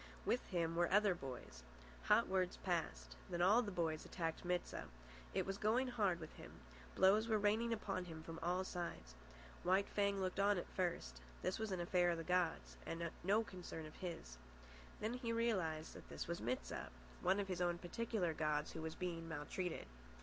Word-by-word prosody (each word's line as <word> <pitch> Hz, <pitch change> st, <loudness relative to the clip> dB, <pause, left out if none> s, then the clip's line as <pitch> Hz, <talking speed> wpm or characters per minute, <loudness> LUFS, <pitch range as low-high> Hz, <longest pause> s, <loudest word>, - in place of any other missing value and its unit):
With 250 Hz, -, +2 dB
him 165 Hz, -3 st, 0 dB
were 175 Hz, 0 st, +3 dB
other 205 Hz, 0 st, +5 dB
boys. 130 Hz, -, -7 dB, 0.4 s
Hot -, -, +5 dB
words 185 Hz, -1 st, +1 dB
passed. 60 Hz, -, -1 dB
Then 175 Hz, 0 st, +1 dB
all 210 Hz, +6 st, +7 dB
the 220 Hz, -, -3 dB
boys 165 Hz, -4 st, 0 dB
attacked 165 Hz, -3 st, -3 dB
Mit 180 Hz, 0 st, +1 dB
sah. -, -, -5 dB, 0.5 s
It -, -, +2 dB
was 195 Hz, +1 st, -3 dB
going 240 Hz, +5 st, +3 dB
hard 205 Hz, -8 st, +2 dB
with 155 Hz, -, -8 dB
him. -, -, -10 dB, 0.4 s
Blows 210 Hz, +4 st, +6 dB
were 220 Hz, -2 st, +3 dB
raining 215 Hz, +3 st, +3 dB
upon 195 Hz, -5 st, -1 dB
him 160 Hz, -2 st, -7 dB
from 165 Hz, 0 st, -6 dB
all 180 Hz, +3 st, +1 dB
sides. 170 Hz, -, -4 dB, 0.5 s
White 190 Hz, +2 st, +3 dB
Fang 200 Hz, -1 st, +1 dB
looked 185 Hz, 0 st, -1 dB
on 200 Hz, 0 st, +5 dB
at 175 Hz, -, -2 dB
first. 115 Hz, -, -1 dB, 0.2 s
This 185 Hz, -, 0 dB
was 220 Hz, -2 st, -1 dB
an 185 Hz, -, -1 dB
affair 175 Hz, 0 st, +3 dB
of 170 Hz, -, +1 dB
the 165 Hz, -, -3 dB
gods, 180 Hz, -1 st, +1 dB
and 165 Hz, 0 st, -3 dB
no 205 Hz, +5 st, +4 dB
concern 180 Hz, -5 st, -7 dB
of 155 Hz, -, -10 dB
his. 165 Hz, -, -6 dB, 0.6 s
Then 220 Hz, +2 st, -1 dB
he 245 Hz, -2 st, -2 dB
realised 190 Hz, -10 st, 0 dB
that -, -, -11 dB
this -, -, -4 dB
was 170 Hz, +1 st, -2 dB
Mit 125 Hz, +3 st, -1 dB
sah, -, -, -4 dB, 0.3 s
one 190 Hz, +2 st, +3 dB
of 200 Hz, -, -1 dB
his 180 Hz, -2 st, -2 dB
own 175 Hz, -1 st, +2 dB
particular 185 Hz, -1 st, -1 dB
gods, 150 Hz, -1 st, 0 dB
who 160 Hz, -, -5 dB
was 160 Hz, 0 st, -4 dB
being 165 Hz, -2 st, -3 dB
maltreated. 160 Hz, +3 st, -3 dB
180 Hz, 195 wpm, -41 LUFS, 165-200 Hz, 0.6 s, all